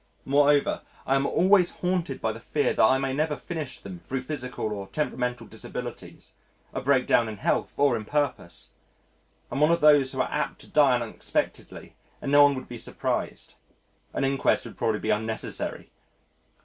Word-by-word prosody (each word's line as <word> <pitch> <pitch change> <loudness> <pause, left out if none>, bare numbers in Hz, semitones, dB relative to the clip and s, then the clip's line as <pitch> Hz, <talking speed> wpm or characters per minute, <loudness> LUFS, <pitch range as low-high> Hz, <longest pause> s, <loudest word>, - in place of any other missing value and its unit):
Moreover 145 +1 +3 0.2
I 135 - +1
am 135 0 +2
always 185 -1 +4
haunted 180 -6 -2
by 110 - 0
the 110 - -8
fear 145 +5 0
that - - +3
I 130 +5 +5
may 135 0 -1
never 150 +2 0
finish 160 -4 -6
them 95 -3 -9
thro' 130 +10 -4
physical 125 -5 -4
or 100 -2 -6
temperamental 125 -1 -2
disabilities 105 - -8 0.4
a - - -3
breakdown 125 -4 +3
in 105 - -7
health - - 0
or 140 -3 +4
in 110 -2 -4
purpose. 145 +4 -2 0.8
I - - -4
am 140 - -1
one 150 - +5
of 170 - +3
those 145 -3 +6
who - - -1
are - - -2
apt - - -2
to - - -14
die 140 -4 +4
unexpectedly 115 -2 -4 0.2
and 140 - -4
no 145 0 +7
one 145 -1 +6
would 130 - -7
be 120 -1 -8
surprised. - - -3 0.6
An - - -2
inquest 135 0 +1
would - - -9
probably 110 -1 -1
be - - 0
unnecessary. 110 +1 -3
135 Hz, 175 wpm, -26 LUFS, 115-145 Hz, 0.8 s, no